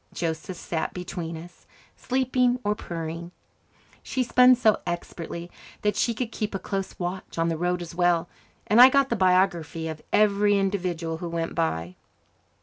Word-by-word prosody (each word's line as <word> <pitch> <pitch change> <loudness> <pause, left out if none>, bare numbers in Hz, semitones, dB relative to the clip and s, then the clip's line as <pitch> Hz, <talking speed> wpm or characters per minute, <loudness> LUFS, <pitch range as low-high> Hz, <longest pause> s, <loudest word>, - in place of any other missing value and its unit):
Joseph 170 +2 -3
sat 160 -1 -3
between 175 -2 -5
us, 175 +2 -13 0.3
sleeping 255 -1 +1
or 205 - +1
purring. 170 -2 -6 0.7
She 260 - -1
spun 250 +1 +6
so 225 -4 +2
expertly 170 0 -5 0.3
that 210 -1 +1
she 230 +2 +1
could 235 0 -3
keep 210 -3 -3
a - - +1
close 195 0 -4
watch 180 0 -5
on 165 0 +1
the 165 - -1
road 175 +2 -1
as 170 - -9
well, 175 -1 +2 0.4
and 220 +4 +6
I 255 - +11
got 275 0 +3
the 235 - +1
biography 180 -4 +1
of 155 -1 -6
every 205 -1 +4
individual 180 -4 -1
who 170 +1 -5
went 165 0 -3
by. 90 - -2
180 Hz, 160 wpm, -25 LUFS, 165-210 Hz, 0.7 s, I